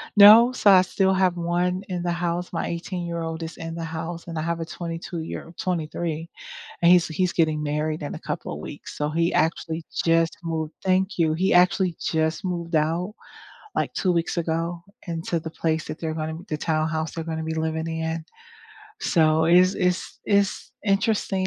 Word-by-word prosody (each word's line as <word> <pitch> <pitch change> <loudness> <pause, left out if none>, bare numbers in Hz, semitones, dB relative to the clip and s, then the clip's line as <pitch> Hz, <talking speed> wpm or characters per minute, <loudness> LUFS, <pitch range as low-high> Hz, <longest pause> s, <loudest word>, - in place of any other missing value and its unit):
no, 220 +4 +9
so, 215 -5 +3
I 185 -1 +7
still 190 +1 +1
have 185 -2 +2
one 175 +2 0
in 175 -1 -3
the 175 - 0
house, 175 +1 -2
my 165 - -1
eighteen-year-old 170 -2 -4
is 160 - -7
in 165 0 -6
the 165 - -4
house 165 +1 -5
and 165 -1 -5
I - - -1
have 170 0 -1
a - - -2
twenty-two-year 165 0 -6
23, 165 -2 -2 0.5
and 170 - +6
he's 180 -1 +6
he's 180 +3 0
getting 155 -2 +1
married 150 +1 -2
in 145 - -4
a - - -6
couple - - -5
of - - -6
weeks - - -9
so 150 0 -1
he 165 +2 +1
actually 160 0 0 0.2
just 165 0 +3
moved 160 -1 -3
Thank 190 0 +1
you. 160 -2 +3
He 185 +3 +2
actually 180 0 +4
just 160 +2 0
moved 170 -2 -3
out 170 +7 0 0.6
like - - -1
2 185 -2 +1
weeks 170 +1 -1
ago 165 +1 -2 0.3
into 165 0 -2
the 160 0 -6
place 160 -1 -1
that 155 - -6
they're 160 -1 -2
gonna 160 0 -4
the 155 - -1
townhouse 160 0 -1
they're 165 -1 -4
gonna 160 -1 -3
be 160 0 -3
living 160 0 -2
in, 160 0 -3 0.8
so 160 - +3
it's 180 +3 +5
it's 180 0 -1
it's 200 -1 +1
interesting, 195 -1 +1
165 Hz, 180 wpm, -24 LUFS, 160-180 Hz, 0.8 s, no